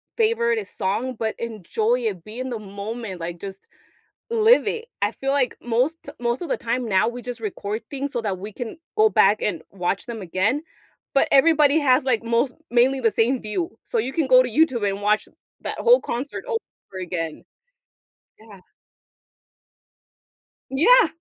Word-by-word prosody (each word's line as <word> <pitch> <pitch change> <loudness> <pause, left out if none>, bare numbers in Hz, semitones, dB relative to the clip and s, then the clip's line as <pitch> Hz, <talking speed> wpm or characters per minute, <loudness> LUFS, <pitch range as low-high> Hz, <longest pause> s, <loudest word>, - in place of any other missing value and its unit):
favorite 460 0 +2
song, 235 +7 -2
but 220 -1 -1
enjoy 225 +2 -1
it, 195 -7 -3
be 220 +4 -9
in 260 0 -4
the 230 - -3
moment, 200 0 -6
like, 170 0 -5
just 195 -1 -8 0.6
live 460 +2 +5
it. 460 0 -2 0.2
I 205 - +2
feel 270 +3 -4
like 275 -3 +1
most 250 +7 +1
t - - -8
most 240 +4 -1
of 340 - -5
the - - 0
time 240 +1 -2
now 190 +2 +3
we 245 +1 -4
just 245 -1 -6
record 210 0 -4
things 280 0 -3
so 240 - -1
that 195 -4 -2
we 205 +3 -7
can 240 +6 -6 0.2
go 435 0 +6
back 205 - +4
and 175 -6 -1
watch 195 +1 -2
them 225 -3 -5
again. 210 - 0 0.5
But 275 - +4
everybody 300 +1 +5
has 265 -1 +4
like 240 -4 +1
most 235 +3 +1 0.2
mainly 255 +3 +3
the 225 -3 +2
same 240 +4 +2
view, 330 - -3
so, 470 - -1
you 265 - -1
can 320 - +1
go 255 0 +7
to 250 - -3
YouTube 245 -6 +2
and 195 +1 -4
watch 210 +1 +2 0.3
that - - -4
whole 485 +1 +5
concert 255 +4 -4
over 435 - -6
again. 165 -3 -4 1.0
Yeah. 210 -4 -14 2.1
Yeah. 415 - +6
240 Hz, 175 wpm, -23 LUFS, 210-280 Hz, 2.1 s, go